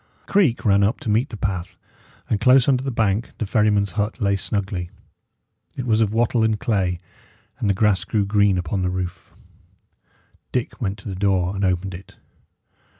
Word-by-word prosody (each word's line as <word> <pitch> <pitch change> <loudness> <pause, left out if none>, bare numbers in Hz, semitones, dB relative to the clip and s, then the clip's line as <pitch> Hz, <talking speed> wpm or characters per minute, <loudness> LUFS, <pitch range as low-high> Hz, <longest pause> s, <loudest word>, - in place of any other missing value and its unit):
A - - -13
creek 170 - +2
ran 100 -1 +4
up 100 +3 +1
to - - -4
meet 115 +6 +1
the 110 - -7
path, 95 -3 -3 0.5
and 105 - 0
close 130 0 +5
under 130 -2 +2
the 135 - -2
bank 110 -2 0
the 110 - -2
ferryman's 105 -2 +2
hut 105 +4 -2
lay 100 -3 +2
snugly. 95 -2 -3 0.9
It 130 - -3
was 110 -2 +2
of 105 -2 +2
wattle 115 +1 +2
and 110 -1 +1
clay, 95 -6 0 0.6
and 105 - 0
the 100 - +2
grass 105 -2 +2
grew 105 -2 0
green 100 -2 +3
upon 90 +2 -2
the 90 - 0
roof. 90 -1 -5 1.2
Dick 125 -2 -3
went 100 -2 -2
to 100 - -11
the - - -4
door 95 -1 +1
and 100 - -2
opened 95 0 0
it. 90 +3 -11
100 Hz, 185 wpm, -22 LUFS, 95-110 Hz, 1.2 s, close